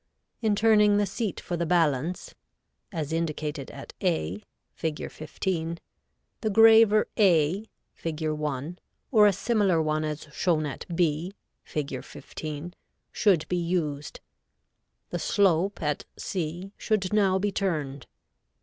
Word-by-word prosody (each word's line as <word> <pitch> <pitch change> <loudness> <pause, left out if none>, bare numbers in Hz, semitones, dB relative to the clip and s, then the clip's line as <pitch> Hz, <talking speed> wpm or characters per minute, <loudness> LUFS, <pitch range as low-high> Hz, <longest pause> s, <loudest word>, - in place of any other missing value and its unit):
In 215 -3 +2
turning 210 -1 +5
the 205 - +3
seat 200 +1 -3
for 175 - -4
the 170 0 -1
balance, 165 -1 +1 0.6
as 160 -4 -3
indicated 155 -3 -2
at - - -10
A, 80 +6 0 0.3
Fig. 160 -2 -4
15, 165 +1 -3 0.6
the 220 - 0
graver 220 0 +6
A, 185 +1 +3 0.2
Fig. 160 -1 -4
1, 150 +2 -3 0.3
or 215 -4 +7
a - - +5
similar 200 -3 +2
one 155 0 0
as 155 0 -4
shown 160 -3 +1
at 145 - -6
B, 170 +2 0 0.3
Fig. 140 -4 -4
15, 155 +3 -7 0.4
should 190 -8 +2
be 180 - 0
used. 165 -4 -2 0.9
The - - -2
slope 195 -2 +2
at 150 -1 -1
C 175 +2 -4
should 210 -3 0
now 195 -3 +4
be 205 +2 0
turned. 150 -10 -2
170 Hz, 125 wpm, -27 LUFS, 155-200 Hz, 0.9 s, or